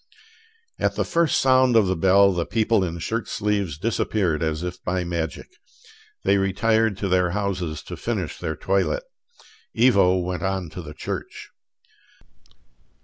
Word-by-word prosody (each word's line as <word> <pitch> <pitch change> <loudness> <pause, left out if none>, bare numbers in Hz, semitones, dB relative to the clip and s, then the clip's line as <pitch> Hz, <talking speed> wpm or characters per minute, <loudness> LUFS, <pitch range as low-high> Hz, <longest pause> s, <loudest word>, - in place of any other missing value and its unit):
At - - 0
the - - 0
first 170 -3 +2
sound 130 -2 +4
of 110 -3 +5
the 95 0 0
bell 95 +3 +4
the 85 -1 -1
people 110 -2 +2
in 85 -2 -3
shirt 115 +7 -3
sleeves 100 -7 -1
disappeared 95 -4 0
as 80 0 -1
if 90 0 -6
by 90 0 -1
magic. 85 -2 -3 0.8
They 100 +1 +3
retired 110 +2 +1
to 100 - -2
their 90 -1 +2
houses 90 -6 -3
to - - -7
finish - - -4
their 80 - -3
toilet: 100 - 0 0.8
Ivo 100 -7 +5
went 90 0 -3
on 95 -4 -2
to 90 - -7
the 75 -2 -10
church. - - -6
95 Hz, 145 wpm, -23 LUFS, 85-105 Hz, 0.8 s, of